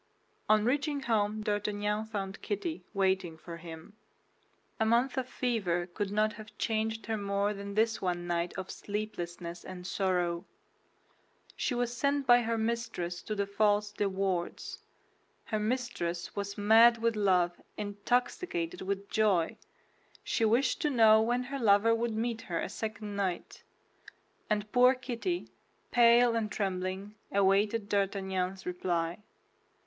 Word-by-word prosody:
On 215 0 +5
reaching 285 +3 0
home 215 -3 0
D'Artagnan 210 0 -1
found 195 -3 -5
Kitty 225 - -3
waiting 190 -4 0
for 170 +1 -9
him. 165 +3 -10 0.9
A - - +3
month 235 +4 +2
of 260 -1 -2
fever 195 -11 0
could 195 +3 -4
not 215 +1 +1
have 215 +1 -12
changed 220 0 -1
her 220 -1 -1
more 200 0 0
than 200 0 -7
this 225 +1 +2
one 175 -2 -1
night 175 0 -1
of 190 0 -5
sleeplessness 175 -5 -5
and 180 -1 -8
sorrow. 180 -2 0 1.1
She 250 - -1
was 245 0 -1
sent 280 +1 +1
by 245 -1 +7
her 230 0 -1
mistress 220 -6 -2
to 215 - -4
the 200 -1 0
false 205 +1 +2
De 205 -1 -1
Wardes. 190 -2 -2 0.7
Her 215 - -1
mistress 215 -7 -2
was 200 0 -4
mad 225 +3 +6
with 230 0 +1
love, 180 -4 +2 0.2
intoxicated 205 - -1
with 195 +1 -3
joy. 200 -7 +2 0.7
She 230 - 0
wished 240 +5 +2
to 300 - +2
know 220 -4 +6
when 240 +3 +1
her 275 +2 -5
lover 220 0 +5
would 230 -1 -1
meet 230 0 -2
her 170 -2 -3
a - - -3
second 210 0 -5
night; 190 -3 -3 0.9
and 210 -1 -1
poor 250 +1 +6
Kitty, 255 +8 -3 0.4
pale 235 0 +6
and 220 -2 -1
trembling, 190 0 -3 0.2
awaited 200 +2 +2
D'Artagnan's 190 -2 -1
reply. 175 -1 -1
210 Hz, 140 wpm, -31 LUFS, 190-230 Hz, 1.1 s, by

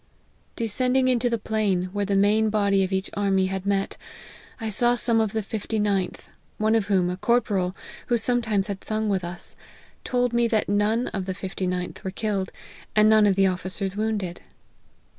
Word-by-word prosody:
Descending 255 +3 +1
into 245 -1 +2
the 235 - 0
plain, 210 -4 0
where 205 0 -1
the 200 - +1
main 210 +2 +3
body 200 -2 +2
of 190 - -2
each 190 0 -2
army 195 -2 +1
had 190 +1 -3
met, 195 -1 0 0.6
I 220 -2 -3
saw 240 +4 +4
some 230 -2 +3
of 220 -2 0
the 220 -1 -2
fifty 220 +1 -3
ninth, 200 -4 -1 0.3
one 215 +1 +2
of 225 -3 +1
whom, 190 -3 +2
a 180 - -4
corporal, 200 -4 +1 0.3
who 240 - +2
sometimes 225 -4 +1
had 200 -2 -6
sung 215 0 -1
with 190 -2 0
us, 175 0 -3 0.5
told 245 -1 0
me 235 0 +3
that 220 -2 0
none 210 +4 +1
of 195 -2 -4
the 190 -1 -4
fifty 190 -1 -4
ninth 180 0 -4
were 190 - -2
killed, 195 -1 -2 0.4
and 215 0 +6
none 215 -1 +6
of 195 - +3
the 195 0 +4
officers 185 +1 -2
wounded. 210 -5 -2
205 Hz, 185 wpm, -25 LUFS, 190-220 Hz, 0.6 s, and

